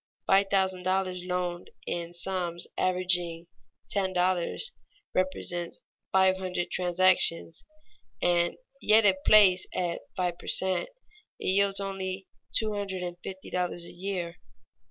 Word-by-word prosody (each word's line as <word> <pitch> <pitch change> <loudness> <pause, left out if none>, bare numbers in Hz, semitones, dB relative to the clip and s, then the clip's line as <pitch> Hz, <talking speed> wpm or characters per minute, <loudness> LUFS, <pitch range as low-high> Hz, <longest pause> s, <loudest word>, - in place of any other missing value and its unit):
Five 195 +1 +4
thousand 190 -2 +1
dollars 185 -1 -1
loaned 180 -1 -3 0.2
in 170 0 -4
sums 175 -1 -1
averaging 180 -2 +1 0.5
ten 190 -2 +1
dollars 180 - 0 0.4
represents 175 -2 -2 0.3
five 190 0 +4
hundred 180 -2 -3
transactions, 180 -2 +2 0.6
and 175 -1 +2 0.3
yet 215 +1 +5
if 190 -2 +5
placed 190 -4 +6
at 175 -2 -1 0.2
five 180 -2 -1
per - - -12
cent, 190 - +1 0.5
it - - -7
yields 200 +1 +2
but 195 -1 -3 0.6
two 215 -1 +1
hundred 195 -3 -3
and 175 -1 -5
fifty 190 0 -8
dollars 180 -1 -2
a - - -10
year. 175 -2 -4
185 Hz, 125 wpm, -28 LUFS, 175-190 Hz, 0.6 s, placed